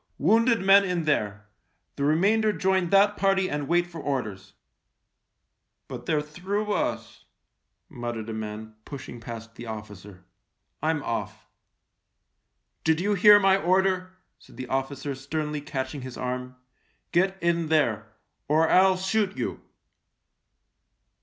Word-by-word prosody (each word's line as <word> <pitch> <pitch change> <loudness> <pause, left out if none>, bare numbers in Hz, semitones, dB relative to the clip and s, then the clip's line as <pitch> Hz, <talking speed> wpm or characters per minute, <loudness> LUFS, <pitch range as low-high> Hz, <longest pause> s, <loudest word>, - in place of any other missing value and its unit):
" - - -44
Wounded 230 +1 +4
men 195 +1 +6
in 180 -3 -1
there! 105 -9 -1 0.5
The 140 - -3
remainder 200 +9 +3
join 190 -3 0
that 200 +2 +4
party 195 -1 +2
and 145 -3 -3
wait 175 +1 +2
for 170 -2 -9
orders! 105 -9 -4 0.5
" - - -54
" - - -54
But - - -8
they're 150 -2 +1
through 195 +7 -3
us," - - -3 0.6
muttered 120 -7 -5
a 115 - -5
man, 110 0 -6
pushing 130 -2 -9
past 115 -1 -9
the 120 +1 -10
officer. 105 -4 -9 0.3
" - - -51
I'm 160 -2 0
off." 115 - -4 0.7
" - - -52
Did 160 0 +2
you 205 +4 +1
hear 205 +1 +7
my 195 -1 +4
order? 185 0 +1
" - - -50
said - - -18
the 130 - -5
officer 135 +1 -2
sternly 150 +2 -4
catching 135 0 -4
his 130 -1 -8
arm. 125 0 -4 0.3
" - - -43
Get 190 +2 +2
in 170 -1 0
there 120 -9 +1 0.2
— - - -52
or 160 +2 +3
I'll 185 +1 +5
shoot 195 +1 -1
you." - - -3
155 Hz, 150 wpm, -26 LUFS, 125-190 Hz, 0.7 s, hear